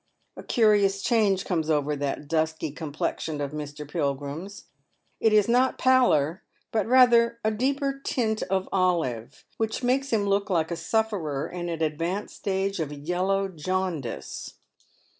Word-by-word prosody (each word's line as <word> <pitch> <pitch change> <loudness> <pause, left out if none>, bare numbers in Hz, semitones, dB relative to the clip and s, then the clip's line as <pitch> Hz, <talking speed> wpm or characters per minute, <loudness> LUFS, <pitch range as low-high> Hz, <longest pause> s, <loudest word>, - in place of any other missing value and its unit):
A - - -8
curious 205 -4 +3
change 210 -5 +2
comes 160 -4 -1
over 150 -1 +1
that 145 +1 -3
dusky 160 -1 -1
complexion 155 0 -3
of 140 -1 -3
Mr. 150 -1 -6
Pilgrim's. 145 +5 -4 0.5
It 225 - +3
is 210 -1 +4
not 250 +2 +3
pallor, 210 - +3 0.3
but 220 - 0
rather 235 -2 +5
a 220 - +2
deeper 275 +4 -1
tint 220 -3 0
of 190 0 0
olive, 170 - -1
which 225 +3 -2
makes 265 +3 +1
him 215 -3 +2
look 200 0 +1
like 165 -3 +1
a - - 0
sufferer 170 -6 -1
in 175 -1 -5
an 165 -1 -2
advanced 165 +6 -2
stage 195 -1 -2
of 155 -3 -2
yellow 180 +7 -1
jaundice. 180 -6 -4
185 Hz, 140 wpm, -26 LUFS, 155-220 Hz, 0.5 s, rather